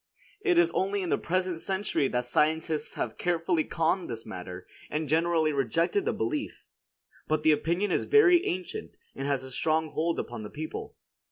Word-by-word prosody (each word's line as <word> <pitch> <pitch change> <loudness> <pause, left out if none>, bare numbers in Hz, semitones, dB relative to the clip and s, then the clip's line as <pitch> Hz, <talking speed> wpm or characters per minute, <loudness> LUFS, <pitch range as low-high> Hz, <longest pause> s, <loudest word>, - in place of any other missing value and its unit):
It 365 -4 +3
is 345 0 +5
only 195 +1 0
in 180 - -3
the - - +3
present 180 -1 -1
century 190 -7 0
that 125 -1 -1
scientists 155 +4 +1
have - - -3
carefully 170 -1 +1
conned 165 +4 0
this 115 -1 -6
matter, 90 -3 -7 0.2
and 155 0 -2
generally 160 0 +2
rejected 165 - +1
the 460 - +2
belief. 300 -3 -3 0.6
But 155 0 0
the 155 - +6
opinion 175 +6 +1
is - - +1
very 370 -5 +6
ancient, 180 0 -4 0.2
and 135 +1 -4
has 140 -2 0
a 130 - -9
strong 155 +3 0
hold 165 +1 0
upon 120 -2 -5
the 105 - -7
people. 155 +1 -6
160 Hz, 175 wpm, -28 LUFS, 145-185 Hz, 0.6 s, the